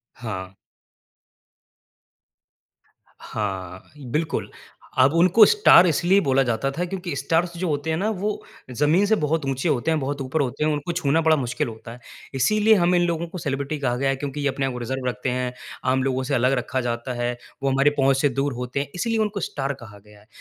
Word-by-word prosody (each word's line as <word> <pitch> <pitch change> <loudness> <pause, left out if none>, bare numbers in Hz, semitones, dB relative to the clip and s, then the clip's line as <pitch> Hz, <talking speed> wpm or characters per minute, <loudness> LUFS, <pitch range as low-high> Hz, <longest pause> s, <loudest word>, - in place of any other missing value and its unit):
हाँ। 95 -6 -6 2.7
हाँ। 95 -3 -5 0.3
बिल्कुल। 160 +1 -1 0.5
अब 130 +3 +5
उनको 185 +6 +6
स्टार 300 - +6
इसलिए 175 +5 +3
बोला 135 -2 +2
जाता 120 +2 -1
था 175 +5 -2
क्योंकि 180 -3 -5
स्टार 165 +4 +1
जो 185 - -2
होते 150 0 -2
हैं 160 - 0
ना 210 +4 0
वो 210 0 -1 0.4
ज़मीन 150 - +2
से 220 +2 +3
बहुत 155 -4 -1
ऊँचे 135 +4 -1
होते 145 +3 0
हैं, 160 - +1
बहुत 140 +1 -3
ऊपर 135 +4 -1
होते 135 +2 -2
हैं, 155 - +2
उनको 150 +3 -2
छूना 165 -2 +1
बड़ा 160 0 +4
मुश्किल 125 -4 -2
होता 115 0 -9
है। 120 - -11 0.4
इसीलिए 215 - +3
हम 180 -2 +3
इन 175 - +3
लोगों 170 0 -2
को 180 +2 -8
सेलिब्रिटी 140 0 -3
कहा 125 -3 0
गया 135 +1 0
है 135 - +1
क्योंकि 145 +1 -5
ये 145 - +1
अपने 135 0 -2
आप 130 -2 -3
रिज़र्व 130 +2 -4
रखते 125 - -3
हैं, 125 0 -2 0.3
आम 130 0 +1
लोगों 130 -1 -1
से 140 +1 -1
अलग 125 +2 +2
रखा 130 +1 -2
जाता 120 +2 -3
है, 120 0 -1 0.3
वो 135 - +2
हमारे 135 +2 +4
पहुँच 135 0 +3
से 145 - +3
दूर 135 +2 -1
होते 125 +2 -4
हैं। 140 - -2
इसीलिए 230 +5 -1
उनको 210 -1 -1
स्टार 140 0 -3
कहा 105 -2 -12
गया 105 0 -17
है। 105 - -23
140 Hz, 205 wpm, -23 LUFS, 125-165 Hz, 2.7 s, उनको